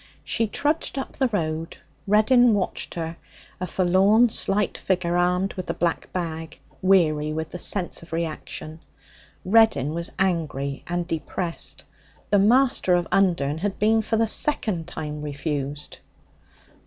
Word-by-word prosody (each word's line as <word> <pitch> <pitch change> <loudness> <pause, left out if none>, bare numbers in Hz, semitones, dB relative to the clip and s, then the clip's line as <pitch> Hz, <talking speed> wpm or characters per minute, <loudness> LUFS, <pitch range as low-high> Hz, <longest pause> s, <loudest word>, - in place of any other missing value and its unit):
She 225 - 0
trudged 295 +6 -1
up 270 - -3
the 265 - +1
road. 165 -7 -3 0.3
Reddin 220 +3 +5
watched 190 -3 -3
her, 165 0 -4 0.4
a 185 - -3
forlorn, 195 +7 +4
slight 205 -1 0
figure 175 -2 -1
armed 180 +2 +1
with 185 -1 -6
the - - -2
black 170 -1 -1
bag, 165 -2 -4 0.2
weary 155 -6 +3
with 160 +1 -4
the 180 - -6
sense 180 0 -1
of 165 - -14
reaction. 160 -1 -5 0.7
Reddin 210 - +4
was 170 +1 -3
angry 150 -7 -1
and 175 0 -1
depressed. 165 +2 -4 0.5
The 205 - +5
master 235 -3 +4
of 175 -1 0
Undern 170 -6 +2
had 195 +2 -2
been 220 +1 +3
for 220 +1 -1
the 225 0 +2
second 210 - 0
time 150 -3 -5
refused. 145 -1 -4
175 Hz, 140 wpm, -24 LUFS, 160-205 Hz, 0.7 s, Reddin